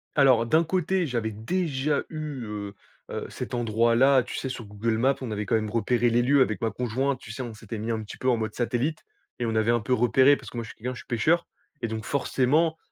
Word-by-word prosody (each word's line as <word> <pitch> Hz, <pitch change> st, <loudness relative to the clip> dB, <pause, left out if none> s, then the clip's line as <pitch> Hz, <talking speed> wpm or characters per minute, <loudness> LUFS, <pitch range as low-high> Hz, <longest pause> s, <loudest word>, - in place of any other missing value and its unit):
Alors 130 Hz, -5 st, +5 dB
d'un 160 Hz, +7 st, +3 dB
côté 185 Hz, +1 st, 0 dB
j'avais 115 Hz, -5 st, -2 dB
déjà 145 Hz, -, -1 dB
eu, 150 Hz, -5 st, -5 dB
heu 105 Hz, -1 st, -5 dB, 0.4 s
heu, -, -, -4 dB
cet -, -, -6 dB
endroit-là 120 Hz, +3 st, +3 dB
tu -, -, -7 dB
sais 130 Hz, -, -3 dB
sur 120 Hz, -3 st, -6 dB
Google 110 Hz, +2 st, -1 dB
Maps, 135 Hz, +4 st, +3 dB
on 120 Hz, -4 st, -4 dB
avait 105 Hz, 0 st, -2 dB
quand 115 Hz, -, +1 dB
même 110 Hz, -1 st, 0 dB
repéré 120 Hz, +2 st, +1 dB
les 120 Hz, +1 st, +3 dB
lieux 135 Hz, +2 st, +4 dB
avec 110 Hz, -6 st, +1 dB
ma 115 Hz, -, 0 dB
conjointe. 130 Hz, +3 st, -1 dB
Tu 110 Hz, -, -10 dB
sais 130 Hz, -, -5 dB
on 120 Hz, -3 st, -5 dB
s'était 110 Hz, +1 st, -7 dB
mis 110 Hz, +2 st, -3 dB
un 110 Hz, -1 st, -1 dB
petit 105 Hz, -, -10 dB
peu 130 Hz, -, 0 dB
en 120 Hz, -, +3 dB
mode 110 Hz, -1 st, -3 dB
satellite 125 Hz, +6 st, -1 dB, 0.4 s
et 120 Hz, -, 0 dB
on 110 Hz, -1 st, -1 dB
avait 110 Hz, +1 st, +3 dB
un 120 Hz, -, +3 dB
peu 125 Hz, +4 st, -1 dB
repéré 130 Hz, +4 st, +5 dB
parce -, -, -10 dB
que 120 Hz, -, -9 dB
moi 115 Hz, -, -2 dB
je 110 Hz, -, -10 dB
suis -, -, -11 dB
quelqu'un 125 Hz, +3 st, -4 dB
je -, -, -9 dB
suis -, -, -13 dB
pêcheur. 160 Hz, +8 st, +2 dB, 0.4 s
Et 115 Hz, -, -1 dB
donc 110 Hz, 0 st, -5 dB
forcément 145 Hz, +5 st, +1 dB
120 Hz, 250 wpm, -26 LUFS, 110-135 Hz, 0.4 s, Alors